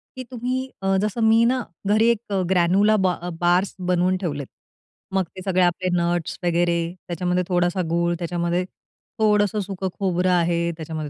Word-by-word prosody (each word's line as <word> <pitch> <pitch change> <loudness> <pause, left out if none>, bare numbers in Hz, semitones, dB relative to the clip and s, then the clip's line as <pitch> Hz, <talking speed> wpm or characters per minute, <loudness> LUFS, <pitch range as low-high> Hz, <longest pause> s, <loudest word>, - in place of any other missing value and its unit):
की 255 - -6
तुम्ही 255 +2 -3
अ, 195 0 +1
जसं 215 +2 -2
मी 225 +1 +5
ना 250 +1 +1 0.2
घरी 215 +2 +4
एक 235 - +3
अ, 195 - +1
ग्रॅन्यला 190 +4 +3
बा 180 - +3
अ, 175 - -4
बार्स 175 +2 +2
बनवून 180 +1 +2
ठेवलेत. 145 -7 -4 0.7
मग 190 -1 +2
ते 185 - -7
सगळे 185 -1 +2
आपले 180 +1 +1
नट्स 170 -1 -1
वगैरे, 170 0 +2 0.3
त्याच्यामध्ये 180 +1 -1
थोडासा 175 0 +1
गूळ, 170 +1 +1
त्याच्यामध्ये 175 +1 -1 0.6
थोडंसं 210 -1 +2
सुकं 190 -1 -4
खोबरं 185 -1 +1
आहे, 170 -1 +1
त्याच्यामध्ये 155 -2 -5
180 Hz, 160 wpm, -23 LUFS, 175-200 Hz, 0.7 s, मी